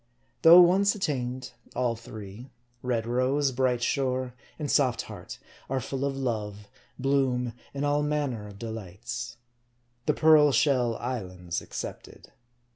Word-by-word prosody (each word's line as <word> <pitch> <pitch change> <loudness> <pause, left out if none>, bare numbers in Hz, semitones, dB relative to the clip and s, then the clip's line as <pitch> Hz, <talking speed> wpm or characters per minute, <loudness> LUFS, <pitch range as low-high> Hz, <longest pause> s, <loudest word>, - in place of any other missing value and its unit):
Though 170 +2 +10
once 195 +4 +4
attained, 130 -9 -3 0.2
all 120 -2 +1
three 110 +1 -10 0.3
red 120 -3 -1
rose, 130 +4 +1
bright 125 -1 +1
shore, 130 -1 0 0.2
and 150 -2 -3
soft 130 -5 +2
heart - - -9 0.3
are 135 0 0
full 130 +2 -4
of 135 -1 -2
love, 105 -5 -3 0.3
bloom, 130 -3 +1 0.2
and 140 +1 -2
all 145 0 +2
manner 145 -8 -1
of 100 -1 -11
de 115 +2 -5
lights. 115 +4 -6 0.7
The 150 - +3
Pearl 155 -2 +6
SheU 125 -5 +3
islands 95 -8 -4
excepted. - - -8
125 Hz, 130 wpm, -27 LUFS, 115-140 Hz, 0.7 s, Though